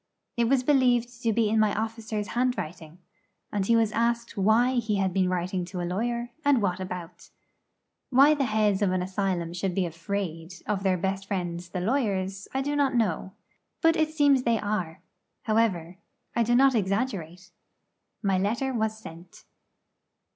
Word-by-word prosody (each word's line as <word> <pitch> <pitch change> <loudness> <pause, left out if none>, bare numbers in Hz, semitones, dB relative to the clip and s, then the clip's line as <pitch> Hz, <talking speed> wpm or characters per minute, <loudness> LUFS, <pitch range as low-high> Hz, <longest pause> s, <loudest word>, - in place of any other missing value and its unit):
It 235 - +2
was 255 +1 +2
believed 245 -3 +2
to 230 - +1
be 220 0 +2
in 220 +1 +2
my 215 -1 +2
officer's 220 -1 -4
handwriting; 180 -10 -2 0.5
and 205 -2 0
he 230 - +4
was 225 -2 +3
asked 235 +1 0
why 230 +6 +3
he 220 -3 -1
had 190 -2 0
been 185 -1 +2
writing 180 0 -1
to 180 +1 -6
a 175 - -2
lawyer, 235 +6 -2
and 285 -3 +4
what 190 -3 -1
about. 180 -2 -7 0.8
Why 275 +4 +6
the 285 -3 0
heads 215 -3 +1
of 200 -3 +2
an 185 -1 0
asylum 185 -3 -2
should 180 0 -2
be 190 - +1
afraid 170 0 -4
of 205 -2 -1
their 190 -2 +2
best 195 +2 -2
friends 175 -3 -3
the 180 0 -4
lawyers, 195 -4 -1
I 265 0 -1
do 290 +1 -1
not 275 -3 +1
know. 190 -4 0 0.5
But 325 0 +5
it 315 -1 +1
seems 290 -4 +3
they 235 -2 +2
are. 205 -6 -3 0.4
However, 190 -6 0 0.4
I 235 - +2
do 240 +1 +2
not 270 +1 +5
exaggerate. 195 -4 -2 0.7
My 195 -2 +2
letter 235 +7 -1
was 220 -2 -1
sent. 175 -4 -12
210 Hz, 170 wpm, -27 LUFS, 185-235 Hz, 0.8 s, Why